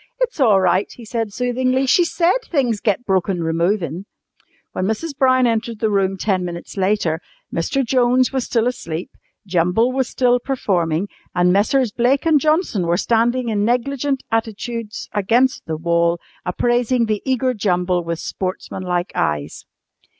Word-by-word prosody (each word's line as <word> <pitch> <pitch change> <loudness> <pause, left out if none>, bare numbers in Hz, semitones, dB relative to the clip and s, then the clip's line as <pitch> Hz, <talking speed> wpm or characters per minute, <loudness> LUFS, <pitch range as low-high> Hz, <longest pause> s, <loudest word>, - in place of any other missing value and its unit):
"It's - - -1
all 220 -8 +5
right," 185 +1 +1
he 235 - -12
said 225 -1 -3
soothingly. 255 +3 0
"She 350 +7 +4
said 340 +2 +2 0.2
things 250 - +1
get 210 +4 0
broken 190 -2 0
removin'." 170 +1 -1 0.7
When 185 - -2
Mrs. 280 +8 -3
Brown 255 -1 +3
entered 230 -1 -1
the 220 -1 +1
room 195 -1 +1
ten 190 -1 0
minutes 170 -1 -7
later, 190 -5 0 0.3
Mr. 255 +11 0
Jones 250 +1 +2
was 265 -2 -1
still 230 -2 +1
asleep, 175 -9 -4 0.3
Jumble 180 +6 +2
was 260 -1 -1
still 245 -1 +2
performing, 190 - -1 0.3
and 180 0 +3
Messrs. 225 +4 +2
Blake 250 +7 +1
and 315 -2 +4
Johnson 305 - +1
were 170 +1 +2
standing 235 +3 +1
in 205 -2 0
negligent 270 +4 0
attitudes 225 0 -3
against 235 +5 +1
the 160 -1 -2
wall 170 +1 +1 0.3
appraising 240 +5 +1
the 215 -2 -1
eager 260 -1 0
Jumble 180 -4 0
with 170 0 -3
sportsmanlike 185 0 -3
eyes. 75 -2 -2
220 Hz, 150 wpm, -20 LUFS, 180-255 Hz, 0.7 s, all